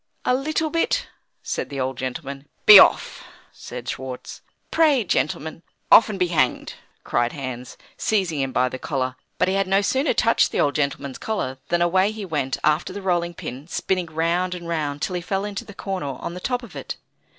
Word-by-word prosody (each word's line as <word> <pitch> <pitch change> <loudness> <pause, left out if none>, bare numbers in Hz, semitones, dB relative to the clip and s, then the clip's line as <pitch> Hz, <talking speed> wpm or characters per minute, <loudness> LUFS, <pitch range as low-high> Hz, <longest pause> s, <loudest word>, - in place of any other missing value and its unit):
"A - - +3
little 310 +4 -1
bit," 330 - +1 0.4
said - - -3
the 140 - -5
old 130 0 -1
gentleman. 135 +3 -5 0.2
"Be 210 -2 +12
off!" - - +4 0.3
said - - -9
Schwartz. 130 -1 -6 0.3
"Pray, 300 -7 +4
gentlemen 160 -3 -1 0.2
" - - -45
"Off, 230 - +8
and 210 - -3
be 180 -2 +1
hanged!" 150 -7 0 0.3
cried 120 0 0
Hans, 130 -3 -6 0.2
seizing 185 -8 0
him 135 -1 -1
by 130 0 +2
the 130 +1 -6
collar. 130 -3 -2 0.2
But - - +2
he 190 - +1
had 195 -1 +1
no 195 +2 +3
sooner 265 +8 +1
touched 230 -1 +3
the - - -1
old 145 - +2
gentleman's 140 -2 -2
collar, 130 -12 -3
than 175 0 +2
away 185 +3 +3
he 215 -2 -6
went 145 -6 -2
after 155 +2 +2
the 200 - -6
rolling 175 -2 0
pin, 135 +2 -7
spinning 180 0 -1
round 170 +3 0
and 170 -1 -8
round, 150 -3 -2
till - - -1
he 180 - -2
fell 195 +3 -2
into 205 -1 -5
the 205 - -12
corner 185 -10 -4
on - - -5
the 180 - -6
top 245 +5 -2
of 235 - -12
it. - - -6
170 Hz, 200 wpm, -23 LUFS, 140-195 Hz, 0.4 s, Be